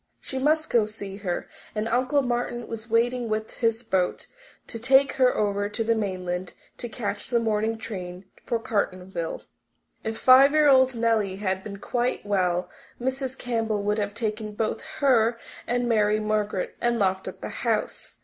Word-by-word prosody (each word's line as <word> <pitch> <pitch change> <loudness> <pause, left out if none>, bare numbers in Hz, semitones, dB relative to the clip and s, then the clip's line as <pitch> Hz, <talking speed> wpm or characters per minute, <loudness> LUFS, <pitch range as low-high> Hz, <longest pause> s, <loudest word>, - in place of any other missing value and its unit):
She 265 - -5
must 310 +3 +2
go 225 -3 +4
to - - -11
see 200 -2 -7
her, 185 -4 -3 0.3
and 215 +1 -1
Uncle 255 +4 +2
Martin 240 -1 -2
was 230 0 -7
waiting 235 +1 +1
with 215 0 -2
his 230 0 +1
boat 190 -5 0 0.4
to 230 - -7
take 265 +3 +4
her 255 -1 +4
over 205 -1 0
to 225 +2 -2
the 230 +1 +2
mainland 185 -4 -3 0.3
to 240 - -5
catch 220 -1 -4
the 240 -2 +3
morning 220 0 0
train 185 -4 -7 0.2
for 235 - 0
Cartonville. 185 -6 -3 0.6
If 220 0 -3
five 270 +2 +7
year 305 -1 +5
old 260 -2 +5
Nellie 225 -4 +1
had 190 -1 -2
been 200 -1 -7
quite 240 +4 -1
well 180 -3 +1 0.3
Mrs. 260 +1 -2
Campbell 225 -4 -1
would 210 +1 +1
have 205 -1 -2
taken 215 -2 -3
both 220 0 -1 0.2
her 235 -4 +4 0.3
and 245 0 0
Mary 215 -2 +3
Margaret 210 -3 -1
and 240 0 +2
locked 190 -2 0
up - - -7
the - - -4
house. - - -2
220 Hz, 170 wpm, -26 LUFS, 205-245 Hz, 0.6 s, five